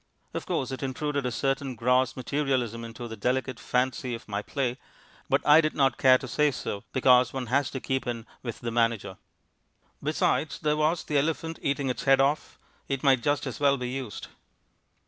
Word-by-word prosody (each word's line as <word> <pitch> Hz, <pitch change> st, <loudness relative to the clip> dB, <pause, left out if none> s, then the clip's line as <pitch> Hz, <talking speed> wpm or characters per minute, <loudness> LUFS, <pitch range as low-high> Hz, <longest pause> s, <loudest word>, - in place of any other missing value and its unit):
Of -, -, -5 dB
course 130 Hz, -, -1 dB
it 130 Hz, -, -5 dB
intruded 140 Hz, 0 st, -2 dB
a -, -, -2 dB
certain 135 Hz, +1 st, -1 dB
gross 125 Hz, +2 st, +2 dB
materialism 130 Hz, -4 st, -1 dB
into 115 Hz, +1 st, -7 dB
the 110 Hz, -, -7 dB
delicate 125 Hz, +3 st, -1 dB
fancy 125 Hz, -1 st, -1 dB
of 115 Hz, -, -11 dB
my 100 Hz, -1 st, -2 dB
play, 125 Hz, +1 st, -2 dB, 0.5 s
but -, -, +2 dB
I 150 Hz, +2 st, +8 dB
did 155 Hz, -1 st, -1 dB
not 135 Hz, -3 st, +2 dB
care 130 Hz, -1 st, +7 dB
to 130 Hz, -, -8 dB
say 150 Hz, +5 st, +2 dB
so, 105 Hz, -6 st, -5 dB
because 125 Hz, -1 st, +4 dB
one 130 Hz, -2 st, -3 dB
has 140 Hz, -2 st, +3 dB
to 130 Hz, -, -5 dB
keep 130 Hz, 0 st, -2 dB
in 115 Hz, -2 st, -3 dB, 0.2 s
with 120 Hz, -3 st, -6 dB
the 115 Hz, -, -3 dB
manager. 115 Hz, -4 st, 0 dB, 0.8 s
Besides, -, -, 0 dB
there 150 Hz, -1 st, 0 dB
was 155 Hz, +3 st, +1 dB
the 145 Hz, -2 st, +1 dB
elephant, 160 Hz, +2 st, -2 dB
eating 140 Hz, 0 st, 0 dB
its 125 Hz, -, -3 dB
head 135 Hz, -1 st, +5 dB
off; 140 Hz, +3 st, +1 dB, 0.3 s
it 135 Hz, -1 st, -2 dB
might 135 Hz, -3 st, +4 dB
just 145 Hz, +3 st, 0 dB
as -, -, -5 dB
well 140 Hz, -1 st, +4 dB
be 125 Hz, -1 st, -4 dB
used. 130 Hz, -5 st, -6 dB
130 Hz, 190 wpm, -27 LUFS, 120-140 Hz, 0.8 s, I